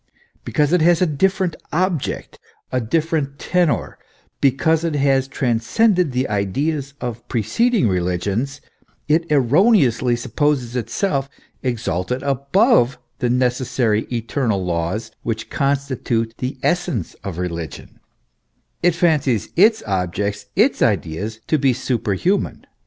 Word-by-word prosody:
Because 150 Hz, +2 st, +1 dB
it 180 Hz, -, +4 dB
has 170 Hz, +1 st, +4 dB
a 185 Hz, -, +4 dB
different 185 Hz, +3 st, 0 dB, 0.2 s
object, 175 Hz, -2 st, -2 dB, 0.3 s
a 130 Hz, -, 0 dB
different 150 Hz, +2 st, -1 dB
tenour, 175 Hz, -3 st, 0 dB, 0.4 s
because 160 Hz, +4 st, +2 dB
it 165 Hz, -3 st, -1 dB
has 135 Hz, -2 st, +2 dB
transcended 140 Hz, -, +1 dB
the 125 Hz, +1 st, 0 dB
ideas 135 Hz, +8 st, -1 dB
of 120 Hz, -2 st, -6 dB
preceding 215 Hz, -, +1 dB
religions, 95 Hz, +9 st, -1 dB, 0.5 s
it 160 Hz, +2 st, +1 dB
erroneously 135 Hz, -, +4 dB
supposes 125 Hz, 0 st, -1 dB
itself 135 Hz, -, -1 dB, 0.3 s
exalted 120 Hz, -1 st, -2 dB
above 140 Hz, -, +3 dB, 0.2 s
the 125 Hz, -, 0 dB
necessary 125 Hz, -3 st, +1 dB
eternal 115 Hz, -4 st, -1 dB
laws 90 Hz, +6 st, -2 dB
which 110 Hz, -1 st, -4 dB
constitute 135 Hz, -5 st, -1 dB
the 130 Hz, +2 st, -3 dB
essence 175 Hz, -, 0 dB
of 95 Hz, -4 st, -5 dB
religion 85 Hz, -3 st, -6 dB, 0.8 s
it 175 Hz, -1 st, +3 dB
fancies 150 Hz, -, +1 dB
its 215 Hz, +5 st, +4 dB
object, 100 Hz, +1 st, -2 dB
its -, -, +3 dB
ideas, 105 Hz, +8 st, -1 dB
to 155 Hz, -, +1 dB
be 135 Hz, -2 st, +3 dB
superhuman. 125 Hz, -, -1 dB
130 Hz, 115 wpm, -20 LUFS, 115-160 Hz, 0.8 s, it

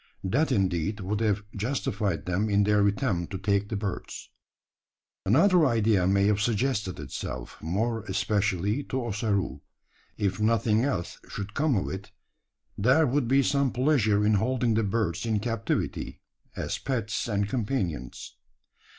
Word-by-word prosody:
That 135 Hz, +11 st, +1 dB
indeed 95 Hz, -1 st, 0 dB
would 100 Hz, +3 st, -2 dB
have 105 Hz, -2 st, +1 dB
justified 105 Hz, -, -2 dB
them 95 Hz, +4 st, 0 dB
in 100 Hz, 0 st, +3 dB
their 105 Hz, 0 st, +3 dB
attempt 100 Hz, -, -1 dB
to -, -, -2 dB
take 100 Hz, +1 st, 0 dB
the 110 Hz, -, -2 dB
birds. 100 Hz, -1 st, -5 dB, 1.0 s
Another 170 Hz, -, +5 dB
idea 110 Hz, -8 st, +3 dB
may 100 Hz, +1 st, +3 dB
have 105 Hz, 0 st, +2 dB
suggested 105 Hz, -, 0 dB
itself 65 Hz, -3 st, -6 dB
more 110 Hz, +8 st, -1 dB
especially 100 Hz, +3 st, 0 dB
to 130 Hz, -, -2 dB
Ossaroo. 100 Hz, -, -1 dB, 0.6 s
If 100 Hz, 0 st, -1 dB
nothing 110 Hz, 0 st, +2 dB
else 130 Hz, -11 st, -2 dB
should 100 Hz, +1 st, -6 dB
come 145 Hz, -2 st, +1 dB
of 95 Hz, -, -1 dB
it, 95 Hz, +1 st, -7 dB, 0.6 s
there 130 Hz, +9 st, +4 dB
would 130 Hz, -1 st, +1 dB
be 135 Hz, +2 st, +4 dB
some 140 Hz, -1 st, +1 dB
pleasure 120 Hz, -6 st, +2 dB
in 110 Hz, -, +4 dB
holding 125 Hz, -1 st, +1 dB
the 110 Hz, +1 st, +2 dB
birds 100 Hz, -4 st, -1 dB
in 110 Hz, -2 st, 0 dB
captivity 115 Hz, 0 st, -2 dB, 0.4 s
as -, -, -3 dB
pets 115 Hz, -6 st, -2 dB
and 100 Hz, -2 st, 0 dB
companions. 100 Hz, -, -3 dB
105 Hz, 140 wpm, -27 LUFS, 100-120 Hz, 1.0 s, Another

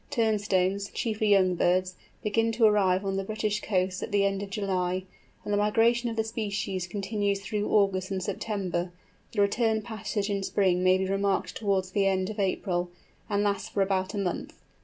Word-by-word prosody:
Turnstones, 200 Hz, -3 st, +1 dB
chiefly 215 Hz, -2 st, -1 dB
young 190 Hz, -2 st, +5 dB
birds, 180 Hz, +1 st, +1 dB, 0.3 s
begin 225 Hz, +1 st, +1 dB
to 225 Hz, 0 st, +4 dB
arrive 200 Hz, -3 st, +3 dB
on 195 Hz, 0 st, -1 dB
the 195 Hz, -, -1 dB
British 215 Hz, 0 st, -2 dB
coasts 185 Hz, -2 st, 0 dB
at -, -, -5 dB
the 200 Hz, -1 st, +3 dB
end 195 Hz, 0 st, 0 dB
of 200 Hz, -, -5 dB
July, 185 Hz, -2 st, -1 dB, 0.4 s
and 205 Hz, -, -2 dB
the -, -, +3 dB
migration 230 Hz, +3 st, +3 dB
of 225 Hz, -, -4 dB
the 220 Hz, -, +1 dB
species 200 Hz, -5 st, -3 dB
continues 200 Hz, +1 st, -1 dB
through 210 Hz, 0 st, -2 dB
August 195 Hz, -2 st, +2 dB
and 190 Hz, -2 st, -2 dB
September; 185 Hz, -4 st, -2 dB, 0.4 s
the 205 Hz, -, +1 dB
return 220 Hz, +2 st, +2 dB
passage 210 Hz, -2 st, -3 dB
in 200 Hz, -2 st, -1 dB
spring 185 Hz, -2 st, +1 dB
may 185 Hz, 0 st, +5 dB
be 190 Hz, -, -1 dB
remarked 195 Hz, 0 st, 0 dB
towards 195 Hz, -3 st, 0 dB
the 195 Hz, 0 st, +2 dB
end 190 Hz, 0 st, 0 dB
of 215 Hz, -, -8 dB
April, 180 Hz, -2 st, 0 dB, 0.4 s
and 205 Hz, 0 st, +1 dB
lasts 200 Hz, -1 st, -1 dB
for 200 Hz, -, +1 dB
about 190 Hz, 0 st, -1 dB
a -, -, -2 dB
month. 190 Hz, -3 st, -3 dB
200 Hz, 185 wpm, -28 LUFS, 185-210 Hz, 0.4 s, young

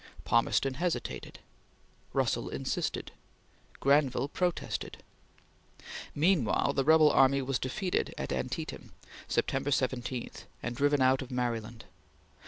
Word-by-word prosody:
Palmerston 125 Hz, +3 st, +2 dB
hesitated; 170 Hz, +5 st, -3 dB, 0.7 s
Russell -, -, 0 dB
insisted; -, -, -3 dB, 0.7 s
Granville 140 Hz, -1 st, +2 dB
protested. 180 Hz, +2 st, -2 dB, 1.1 s
Meanwhile 145 Hz, -, +2 dB
the 135 Hz, -, +1 dB
rebel 155 Hz, +1 st, +6 dB
army 135 Hz, 0 st, +4 dB
was 135 Hz, 0 st, -1 dB
defeated 180 Hz, +8 st, -1 dB
at -, -, -3 dB
Antietam, -, -, -4 dB, 0.3 s
September 135 Hz, +1 st, 0 dB
17, 130 Hz, -2 st, -1 dB, 0.3 s
and 120 Hz, 0 st, -3 dB
driven 145 Hz, 0 st, +3 dB
out 130 Hz, +1 st, +4 dB
of 130 Hz, -, -7 dB
Maryland. 120 Hz, -3 st, -3 dB
135 Hz, 100 wpm, -30 LUFS, 125-145 Hz, 1.1 s, rebel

